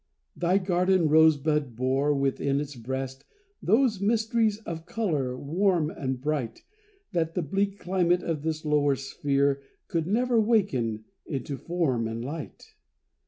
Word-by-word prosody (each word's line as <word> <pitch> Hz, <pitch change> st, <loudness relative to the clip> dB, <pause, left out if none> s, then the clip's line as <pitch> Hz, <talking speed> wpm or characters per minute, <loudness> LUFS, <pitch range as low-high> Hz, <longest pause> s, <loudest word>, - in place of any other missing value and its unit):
Thy 180 Hz, +2 st, +2 dB
garden 180 Hz, -2 st, +2 dB
rosebud 150 Hz, -4 st, +3 dB
bore, 135 Hz, +4 st, +1 dB
within 140 Hz, 0 st, 0 dB
its 145 Hz, -1 st, -5 dB
breast, 130 Hz, +2 st, -5 dB, 0.4 s
Those 220 Hz, 0 st, +2 dB
mysteries 220 Hz, 0 st, +2 dB
of 165 Hz, -4 st, -7 dB
color, 150 Hz, -, -1 dB
warm 165 Hz, +2 st, +1 dB
and 130 Hz, -4 st, -3 dB
bright, 140 Hz, -4 st, -3 dB, 0.5 s
That 165 Hz, -3 st, -1 dB
the 180 Hz, -, 0 dB
bleak 195 Hz, +6 st, -1 dB
climate 180 Hz, -1 st, +1 dB
of 160 Hz, -3 st, -2 dB
this 155 Hz, 0 st, -3 dB
lower 145 Hz, -2 st, +3 dB
sphere 140 Hz, +1 st, 0 dB, 0.3 s
Could 165 Hz, -1 st, -1 dB
never 240 Hz, +4 st, +2 dB
waken 130 Hz, -, +1 dB, 0.2 s
into 140 Hz, -2 st, -3 dB
form 135 Hz, -8 st, -1 dB
and 115 Hz, +1 st, -4 dB
light. 150 Hz, +2 st, -8 dB
155 Hz, 130 wpm, -27 LUFS, 135-185 Hz, 0.5 s, rosebud